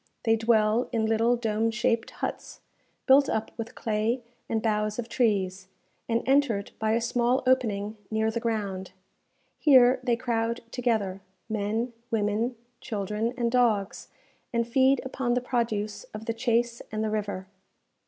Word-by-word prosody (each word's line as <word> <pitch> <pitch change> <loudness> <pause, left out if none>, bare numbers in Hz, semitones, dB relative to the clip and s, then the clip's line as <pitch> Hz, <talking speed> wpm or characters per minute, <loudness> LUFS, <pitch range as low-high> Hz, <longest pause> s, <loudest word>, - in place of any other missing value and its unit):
They 225 -1 +4
dwell 225 +1 +2
in 225 -3 +1
little 225 +2 +3
dome 225 -1 0
shaped 230 0 0
huts, - - -6 0.4
built 275 +1 +6
up 220 0 -1
with 230 0 -6
clay 225 +3 -1 0.3
and 225 - +1
boughs 215 -1 0
of 240 -2 -3
trees, 195 -6 0 0.4
and 230 0 +1
entered 265 -7 +2
by 220 0 +1
a 230 - +3
small 240 +2 +1
opening 220 -5 +1
near 220 0 +1
the 235 - -2
ground. 200 -5 -3 0.7
Here 255 -3 +6
they 245 -2 +1
crowd 235 -1 -1
together, 220 -6 -1 0.3
men, 220 +3 -2 0.2
women, 220 +2 0 0.2
children, 215 +1 -2
and 235 -1 0
dogs, 225 -6 +1 0.4
and 235 -1 0
feed 265 +2 +3
upon 255 -2 -1
the - - +3
produce 230 - -2
of 220 - -7
the 230 - -1
chase 235 0 0
and 215 0 -2
the 215 - -1
river. 205 -3 -3
225 Hz, 145 wpm, -27 LUFS, 215-240 Hz, 0.7 s, built